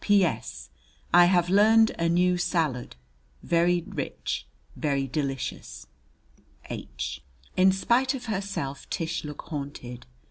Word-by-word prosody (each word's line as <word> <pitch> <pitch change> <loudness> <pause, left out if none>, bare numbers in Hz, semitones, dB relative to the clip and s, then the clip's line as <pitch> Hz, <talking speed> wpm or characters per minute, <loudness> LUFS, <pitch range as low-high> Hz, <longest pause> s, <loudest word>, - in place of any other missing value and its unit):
P.S. 200 - +1 0.4
I 175 0 +8
have 175 -1 +3
lerned 220 +3 +6
a 170 0 +2
new 180 +1 +3
salud 160 - -1 0.5
very 175 0 +2
rich, - - -4 0.3
but 140 -3 -1
delissious. 130 - -4 0.9
H. 65 +2 -5 0.3
In 185 +1 +6
spite 245 +8 +2
of 250 - -7
herself, 195 - -4
Tish 165 +1 -2
looked 150 -1 -8
haunted. 140 - -6
170 Hz, 110 wpm, -27 LUFS, 140-190 Hz, 0.9 s, I